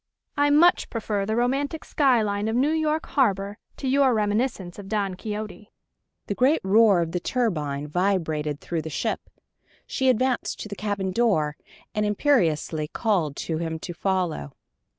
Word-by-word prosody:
I 290 Hz, 0 st, +3 dB
much 330 Hz, +5 st, +4 dB
prefer 210 Hz, -3 st, -2 dB
the 220 Hz, -, 0 dB
romantic 275 Hz, +6 st, -1 dB
sky 260 Hz, -6 st, +3 dB
line 205 Hz, 0 st, -1 dB
of 220 Hz, -, -1 dB
New 275 Hz, +5 st, +3 dB
York 315 Hz, 0 st, 0 dB
harbor 205 Hz, -6 st, 0 dB, 0.2 s
to 270 Hz, -, -4 dB
your 265 Hz, -2 st, +4 dB
reminiscence 210 Hz, -3 st, -1 dB
of 200 Hz, -, -9 dB
Don 200 Hz, -3 st, 0 dB
Quixote!" 210 Hz, +1 st, -6 dB, 0.6 s
The -, -, -2 dB
great 265 Hz, +9 st, +3 dB
roar 200 Hz, -1 st, +5 dB
of 165 Hz, -1 st, -2 dB
the 180 Hz, -, -1 dB
turbine 155 Hz, -, -1 dB
vibrated 155 Hz, -4 st, 0 dB
through 170 Hz, -2 st, -3 dB
the 160 Hz, -, -6 dB
ship. -, -, -3 dB, 0.6 s
She 265 Hz, -1 st, +1 dB
advanced 255 Hz, +1 st, 0 dB
to -, -, -5 dB
the 205 Hz, -, -6 dB
cabin 200 Hz, -2 st, -2 dB
door, 185 Hz, -9 st, +1 dB, 0.4 s
and 210 Hz, -1 st, 0 dB
imperiously 175 Hz, -, +1 dB
called 175 Hz, -, 0 dB
to 160 Hz, -1 st, -2 dB
him 165 Hz, -1 st, -3 dB
to 175 Hz, +2 st, -7 dB
follow. 175 Hz, -, -2 dB
205 Hz, 160 wpm, -25 LUFS, 175-245 Hz, 0.6 s, roar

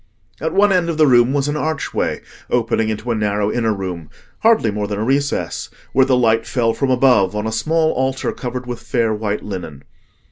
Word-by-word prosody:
At 160 Hz, +3 st, -2 dB
one 205 Hz, +1 st, +4 dB
end 175 Hz, -2 st, +1 dB
of 165 Hz, -, -2 dB
the 155 Hz, -, +5 dB
room 120 Hz, -2 st, +5 dB
was 140 Hz, 0 st, 0 dB
an 145 Hz, -, -1 dB
archway 155 Hz, -1 st, -2 dB, 0.3 s
opening 115 Hz, -2 st, +1 dB
into 110 Hz, +3 st, -3 dB
a -, -, 0 dB
narrow 105 Hz, -1 st, 0 dB
inner 115 Hz, -2 st, 0 dB
room, 90 Hz, -6 st, -5 dB, 0.3 s
hardly 220 Hz, -, +3 dB
more 105 Hz, 0 st, -3 dB
than 100 Hz, 0 st, -3 dB
a 105 Hz, -, -1 dB
recess, 140 Hz, +4 st, -1 dB, 0.2 s
where 135 Hz, 0 st, +4 dB
the 130 Hz, -2 st, +3 dB
light 115 Hz, -2 st, +2 dB
fell 115 Hz, -3 st, +1 dB
from 135 Hz, +4 st, -1 dB
above 125 Hz, -7 st, +3 dB
on 105 Hz, +1 st, -2 dB
a 110 Hz, -, -2 dB
small 155 Hz, +8 st, +1 dB
altar 130 Hz, +1 st, -1 dB
covered 125 Hz, 0 st, -5 dB
with 120 Hz, -1 st, -6 dB
fair 115 Hz, -4 st, 0 dB
white 105 Hz, -1 st, -3 dB
linen. 85 Hz, -8 st, -7 dB
120 Hz, 205 wpm, -19 LUFS, 105-135 Hz, 0.3 s, the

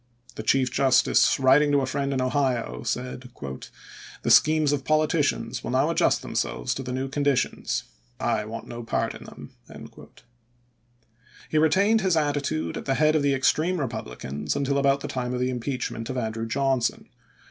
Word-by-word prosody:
The -, -, -6 dB
Chief 130 Hz, +3 st, +2 dB
Justice, 130 Hz, +1 st, +3 dB
writing 135 Hz, +3 st, +5 dB
to 140 Hz, -, +4 dB
a -, -, 0 dB
friend 140 Hz, +1 st, -2 dB
in 130 Hz, -2 st, 0 dB
Ohio, 130 Hz, -2 st, -1 dB
said: 125 Hz, +2 st, -4 dB, 0.5 s
" -, -, -16 dB
The -, -, +1 dB
schemes 155 Hz, -1 st, +5 dB
of 145 Hz, -2 st, -1 dB
politi 155 Hz, +3 st, +2 dB
cians 145 Hz, -, -1 dB
will -, -, -4 dB
now -, -, +2 dB
adjust -, -, +2 dB
themselves 125 Hz, -, -2 dB
to 135 Hz, -, -5 dB
the 125 Hz, -1 st, -5 dB
new 130 Hz, +1 st, -2 dB
condi 140 Hz, -1 st, +1 dB
tions. 125 Hz, 0 st, -2 dB, 0.4 s
I 110 Hz, -3 st, 0 dB
want 115 Hz, +1 st, -7 dB
no 120 Hz, -, -7 dB
part 115 Hz, -, -1 dB
in -, -, -11 dB
them." -, -, -11 dB, 2.0 s
He 155 Hz, -, +2 dB
retained 200 Hz, +8 st, +3 dB
his 185 Hz, -4 st, +2 dB
attitude 145 Hz, -, -1 dB
at -, -, -7 dB
the 135 Hz, -, 0 dB
head 155 Hz, +1 st, +3 dB
of 155 Hz, -, +3 dB
the 140 Hz, -1 st, +2 dB
ex 130 Hz, -, +3 dB
treme 175 Hz, +4 st, -1 dB
Eepublicans 75 Hz, -, -4 dB
until 140 Hz, 0 st, 0 dB
about 140 Hz, 0 st, +2 dB
the -, -, -4 dB
time 125 Hz, -1 st, -3 dB
of -, -, -2 dB
the 125 Hz, +1 st, 0 dB
im 125 Hz, -, -3 dB
peachment 120 Hz, -2 st, -4 dB
of 130 Hz, -, -3 dB
Andrew 115 Hz, -1 st, -3 dB
Johnson. 135 Hz, 0 st, 0 dB
135 Hz, 185 wpm, -25 LUFS, 125-145 Hz, 2.0 s, writing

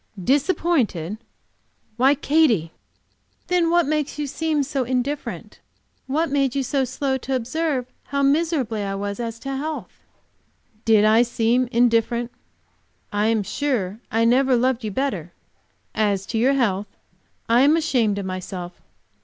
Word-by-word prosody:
"Disappointed? 270 Hz, -, +1 dB, 0.8 s
Why, 265 Hz, +4 st, +4 dB
Katy!" 270 Hz, -, +2 dB, 0.8 s
"Then 355 Hz, -2 st, +2 dB
what 345 Hz, +1 st, +4 dB
did 285 Hz, -, -4 dB
make 300 Hz, -1 st, -1 dB
you 295 Hz, -, -2 dB
seem 305 Hz, +1 st, -1 dB
so 275 Hz, -1 st, -2 dB
indifferent? 255 Hz, +4 st, -3 dB, 0.5 s
What 310 Hz, +3 st, 0 dB
made 275 Hz, -2 st, +1 dB
you 275 Hz, -, +1 dB
so 270 Hz, +1 st, 0 dB
slow 265 Hz, +1 st, -2 dB
to 265 Hz, +1 st, -2 dB
observe 260 Hz, +2 st, -1 dB, 0.2 s
how 280 Hz, 0 st, -1 dB
miserably 275 Hz, -7 st, +1 dB
I 195 Hz, -1 st, -3 dB
was, 200 Hz, +1 st, -4 dB
as 230 Hz, -1 st, -4 dB
to 275 Hz, 0 st, -4 dB
health?" 305 Hz, +3 st, -4 dB, 0.9 s
"Did 215 Hz, -2 st, +5 dB
I 220 Hz, +2 st, +5 dB
seem 240 Hz, +1 st, +1 dB
indifferent? 235 Hz, 0 st, +2 dB, 0.8 s
I 205 Hz, +1 st, +1 dB
am 225 Hz, -2 st, +1 dB
sure 220 Hz, -4 st, -2 dB
I 225 Hz, +1 st, +2 dB
never 255 Hz, +2 st, +4 dB
loved 250 Hz, 0 st, +1 dB
you 215 Hz, -, -2 dB
better. 195 Hz, -, -3 dB, 0.6 s
As 200 Hz, -3 st, 0 dB
to 225 Hz, -, +1 dB
your 260 Hz, +4 st, +3 dB
health, 210 Hz, -7 st, 0 dB, 0.6 s
I 235 Hz, +2 st, +4 dB
am 295 Hz, +4 st, +5 dB
ashamed 235 Hz, -10 st, +1 dB
of 200 Hz, -, -3 dB
myself. 185 Hz, -1 st, -6 dB
250 Hz, 145 wpm, -22 LUFS, 220-280 Hz, 0.9 s, Did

